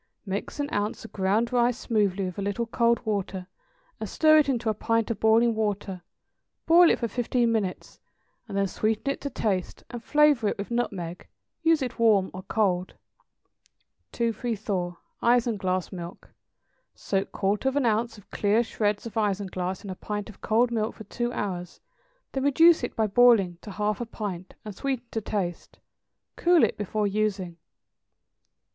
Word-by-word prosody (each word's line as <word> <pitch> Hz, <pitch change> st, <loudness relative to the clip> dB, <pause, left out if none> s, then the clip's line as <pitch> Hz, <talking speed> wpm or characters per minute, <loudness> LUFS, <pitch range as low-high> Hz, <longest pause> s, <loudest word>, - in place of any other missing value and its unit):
= -, -, -49 dB
Mix 200 Hz, +8 st, -4 dB
an 285 Hz, -, 0 dB
ounce 205 Hz, +2 st, -2 dB
of -, -, -12 dB
ground 210 Hz, +5 st, +1 dB
rice 240 Hz, 0 st, +3 dB
smoothly 200 Hz, -6 st, 0 dB
with 180 Hz, +1 st, -5 dB
a -, -, -2 dB
little 205 Hz, +4 st, -1 dB
cold 235 Hz, +1 st, +1 dB
water, 195 Hz, -3 st, -2 dB, 0.5 s
and -, -, -5 dB
stir 310 Hz, -1 st, +5 dB
it 290 Hz, -, +2 dB
into 240 Hz, -3 st, -1 dB
a 220 Hz, -, +3 dB
pint 230 Hz, +2 st, 0 dB
of 215 Hz, -, -3 dB
boiling 225 Hz, +1 st, +4 dB
water; 205 Hz, -4 st, -2 dB, 0.6 s
boil 340 Hz, +1 st, +7 dB
it -, -, +3 dB
for 235 Hz, -, -2 dB
fifteen 240 Hz, +1 st, 0 dB
minutes, 205 Hz, -5 st, -3 dB, 0.5 s
and 200 Hz, -, -4 dB
then 200 Hz, -, +2 dB
sweeten 215 Hz, +7 st, -1 dB
it -, -, -14 dB
to 285 Hz, -, -3 dB
taste 205 Hz, -8 st, -2 dB
and 240 Hz, -2 st, -7 dB
flavor 295 Hz, -6 st, +4 dB
it -, -, -1 dB
with 200 Hz, +3 st, -6 dB
nutmeg. 180 Hz, -8 st, -3 dB, 0.3 s
Use 325 Hz, -3 st, +3 dB
it 250 Hz, -1 st, -5 dB
warm 210 Hz, -5 st, +4 dB
or 185 Hz, -, -6 dB
cold. 185 Hz, -2 st, 0 dB, 1.2 s
234. 215 Hz, -6 st, -2 dB, 0.2 s
=Isinglass 215 Hz, -7 st, +1 dB
Milk.= 175 Hz, -1 st, -9 dB, 0.6 s
Soak 195 Hz, -1 st, -2 dB
quarter 205 Hz, +6 st, 0 dB
of 265 Hz, -, -6 dB
an 285 Hz, -3 st, +2 dB
ounce 225 Hz, 0 st, 0 dB
of 205 Hz, -, -18 dB
clear 210 Hz, +3 st, +2 dB
shreds 210 Hz, -2 st, -1 dB
of 230 Hz, -, -7 dB
isinglass 190 Hz, -4 st, -2 dB
in 200 Hz, -, -6 dB
a -, -, -5 dB
pint 205 Hz, +2 st, -5 dB
of 195 Hz, -, -22 dB
cold 235 Hz, +2 st, +2 dB
milk 220 Hz, -1 st, -1 dB
for 220 Hz, -, -10 dB
two 240 Hz, +4 st, -3 dB
hours; 180 Hz, -6 st, -4 dB, 0.5 s
then 270 Hz, -, -2 dB
reduce 325 Hz, +3 st, +5 dB
it 245 Hz, -, -3 dB
by 220 Hz, -, +2 dB
boiling 205 Hz, -5 st, +4 dB
to -, -, -10 dB
half 210 Hz, +2 st, -2 dB
a 240 Hz, -, -3 dB
pint, 190 Hz, -5 st, -6 dB
and 210 Hz, -, -6 dB
sweeten 265 Hz, -1 st, -3 dB
to 225 Hz, -, -2 dB
taste. 190 Hz, -4 st, -4 dB, 0.6 s
Cool 345 Hz, -2 st, +4 dB
it -, -, +2 dB
before 210 Hz, +1 st, -2 dB
using. 200 Hz, -4 st, -1 dB
215 Hz, 170 wpm, -26 LUFS, 195-235 Hz, 1.2 s, boil